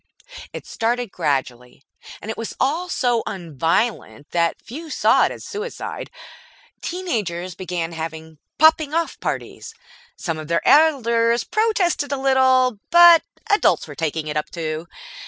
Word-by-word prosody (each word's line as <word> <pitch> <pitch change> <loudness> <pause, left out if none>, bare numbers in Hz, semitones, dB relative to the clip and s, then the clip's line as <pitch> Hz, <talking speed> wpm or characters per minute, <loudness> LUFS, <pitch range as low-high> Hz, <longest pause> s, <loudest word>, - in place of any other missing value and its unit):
It - - -8
started 235 -1 -2
gradually, 130 -5 -3 0.4
and 220 - -4
it - - -5
was 230 - -5
all 320 +7 0
so 245 -7 +1
un 175 -8 -7
violent 165 - -1
that 170 -1 0
few 310 +7 -9
saw - - +3
it - - -2
as - - -9
suicide. 455 +1 -6 0.7
Teen 365 +2 -5
agers 180 - -2
began 175 -2 -4
having 160 -1 -7 0.2
"Popping 315 -1 +4
off 335 0 -1
parties". 450 - -5 0.4
Some 165 -5 -4
of 155 - -8
their 170 +1 0
elders 235 -6 +4
protested 380 -10 0
a 280 - 0
little, 260 -3 +3
but 345 -1 +8 0.3
adults 410 -1 +2
were - - -8
taking 160 -1 -3
it 150 0 -4
up 150 - -2
too. 160 -1 -4
230 Hz, 145 wpm, -21 LUFS, -, 0.7 s, but